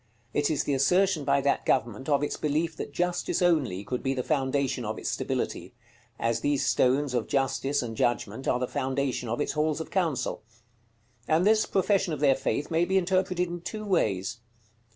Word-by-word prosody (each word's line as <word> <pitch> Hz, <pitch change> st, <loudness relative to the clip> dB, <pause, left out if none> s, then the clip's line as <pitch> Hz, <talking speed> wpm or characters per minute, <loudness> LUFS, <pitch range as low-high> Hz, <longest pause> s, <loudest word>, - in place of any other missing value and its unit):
It 145 Hz, 0 st, +1 dB
is 150 Hz, -2 st, 0 dB
the 145 Hz, -, -1 dB
assertion 165 Hz, +4 st, +2 dB
by 140 Hz, 0 st, +3 dB
that 140 Hz, +1 st, +1 dB
government 125 Hz, +1 st, 0 dB
of 145 Hz, 0 st, +2 dB
its 145 Hz, -, -1 dB
belief 155 Hz, +2 st, -1 dB
that -, -, -5 dB
Justice 175 Hz, +3 st, -1 dB
only 150 Hz, -, +1 dB
could 125 Hz, +3 st, -3 dB
be 135 Hz, 0 st, -1 dB
the 125 Hz, -, -2 dB
foundation 135 Hz, -3 st, 0 dB
of 110 Hz, 0 st, -3 dB
its -, -, -3 dB
stability; -, -, -3 dB, 0.4 s
as 115 Hz, 0 st, 0 dB
these 145 Hz, -1 st, 0 dB
stones 130 Hz, +2 st, +2 dB
of 120 Hz, -3 st, -1 dB
Justice 135 Hz, 0 st, 0 dB
and 115 Hz, -2 st, -5 dB
Judgment 120 Hz, +3 st, -1 dB
are -, -, +2 dB
the 125 Hz, 0 st, -2 dB
foundation 130 Hz, -2 st, -2 dB
of 120 Hz, -, -2 dB
its -, -, 0 dB
halls 150 Hz, +1 st, 0 dB
of 160 Hz, -, -6 dB
council. 165 Hz, -9 st, -1 dB, 0.9 s
And 160 Hz, +3 st, +3 dB
this 215 Hz, +1 st, +4 dB
profession 190 Hz, -2 st, +1 dB
of 150 Hz, -, -4 dB
their 140 Hz, -2 st, +5 dB
faith 140 Hz, +3 st, -2 dB
may 165 Hz, +1 st, +3 dB
be 190 Hz, +2 st, +1 dB
interpreted 185 Hz, -1 st, +1 dB
in 175 Hz, 0 st, -6 dB
two 215 Hz, +4 st, -6 dB
ways. 100 Hz, -, 0 dB
145 Hz, 190 wpm, -27 LUFS, 130-175 Hz, 0.9 s, their